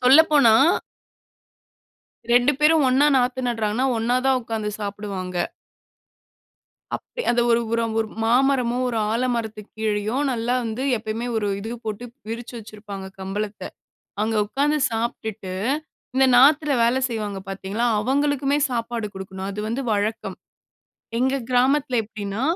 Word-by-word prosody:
சொல்லப்போனா 275 -2 +6 1.8
2 245 +4 +5
பேரும் 310 0 +5
ஒண்ணா 270 +3 +4
நாத்து 250 0 +1
நடுறாங்கன்னா, 225 +2 0
ஒண்ணா 240 +3 +1
தான் 265 -1 +4
உட்கார்ந்து 220 -2 -3
சாப்பிடுவாங்க. 200 -3 -5 1.6
அப்ப 485 - -7
அத 240 - +2
ஒரு 235 0 +4
ஒரு 230 0 +2 0.2
ஒரு 220 - -2 0.2
மாமரமோ! 250 0 +2
ஒரு 230 -2 -1
ஆலமரத்துக்கு 230 -3 -2
கீழயும் 220 +6 0
நல்லா 240 +1 -1
வந்து 225 +3 -3
எப்பயுமே 220 +2 -4
ஒரு 215 -2 0
இது 225 +3 -5
போட்டு 215 +2 -4 0.2
விரிச்சு 235 +2 -6
வச்சிருப்பாங்க 205 -3 -9
கம்பளத்த. 205 +2 -4 0.6
அங்க 220 +1 0
உட்காந்து 290 +7 +1
சாப்பிட்டுட்டு, 220 -4 -4 0.6
இந்த 265 - +5
நாத்துல 290 +3 +5
வேலை 240 +3 +3
செய்வாங்க 210 -4 -4
பார்த்தீங்களா, 195 +4 -2
அவங்களுக்குமே 280 +3 +1
சாப்பாடு 230 -2 -2
குடுக்கணும். 190 0 -6
அது 200 +1 -5
வந்து 240 +5 -2
வழக்கம். 210 +2 -2 0.8
எங்க 265 +2 +2 0.2
கிராமத்தில 255 0 +2
எப்பிடீன்னா, 205 0 -5
230 Hz, 120 wpm, -23 LUFS, 210-255 Hz, 1.8 s, சொல்லப்போனா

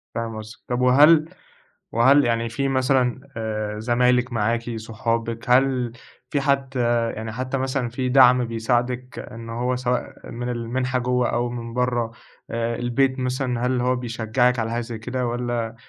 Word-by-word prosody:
فاهم 115 -1 -3
قصدِك، 110 +1 -9
طب 125 0 -1
وهل 150 +5 +6 0.6
وهل 135 +5 +5
يعني 115 0 0
في 135 +4 -1
مثلًا 130 -2 +1 0.2
آآ، 105 -1 -3
زمايلِك 125 +2 +2
معاكِ 115 +1 -1
صحابك، 115 +1 -3
هل 125 -1 +3 0.4
في 145 - 0
حد 135 -1 0 0.4
يعني 110 0 -5
حتى 130 +3 -3
مثلًا 130 -1 -1
في 125 +1 -2
دعم 125 -1 +6
بيساعدِك 120 +2 -1
إنه 115 -1 -8
هو 125 +2 -1
سواء 125 0 -3
من 120 +1 -4
المنحة 125 +2 -1
جوا 125 0 +1
أو 120 +1 -1
من 115 -1 -6
برا، 120 -2 0 0.4
آآ 115 0 -1
البيت 130 +3 0
مثلًا 125 -1 -1
هل 125 -1 +1
هو 125 +1 +2
بيشجعك 120 +1 0
على 115 0 -1
حاجة 120 +1 -1
زي 115 -1 -6
كده، 125 +2 -3
والّا 120 -1 -2
120 Hz, 155 wpm, -23 LUFS, 115-130 Hz, 0.6 s, وهل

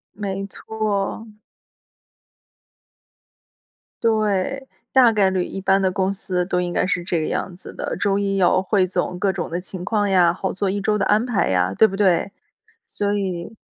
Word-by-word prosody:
没 195 -1 -4
错。 215 +1 -3 2.8
对， 220 +4 0 0.2
大 250 -3 +6
概 200 -3 +3
率 185 -1 -1
一 195 - -6
般 195 +1 +3
的 190 - +2
公 190 +1 0
司 180 -2 -2
都 180 -1 0
应 175 -1 -2
该 - - +1
是 180 -2 -1
这 170 -2 -1
个 - - -2
样 180 - -3
子 185 - -11
的， - - -4
周 200 0 +1
一 195 -1 0
汇 185 +2 +3
总 180 -1 -2
各 195 +1 +1
种 180 -2 -4
的 175 +2 -2
情 185 -1 -7
况 205 -1 0
呀， 175 -3 +4
好 - - -3
做 195 0 -1
一 200 +1 -2
周 210 +1 +1
的 200 - 0
安 215 +3 +3
排 240 -5 +1
呀， 90 0 +1
对 220 - +5
不 195 - -5
对？ 195 -1 +2 0.6
所 205 0 -1
以 190 0 -3
195 Hz, 190 characters per minute, -21 LUFS, 180-205 Hz, 2.8 s, 大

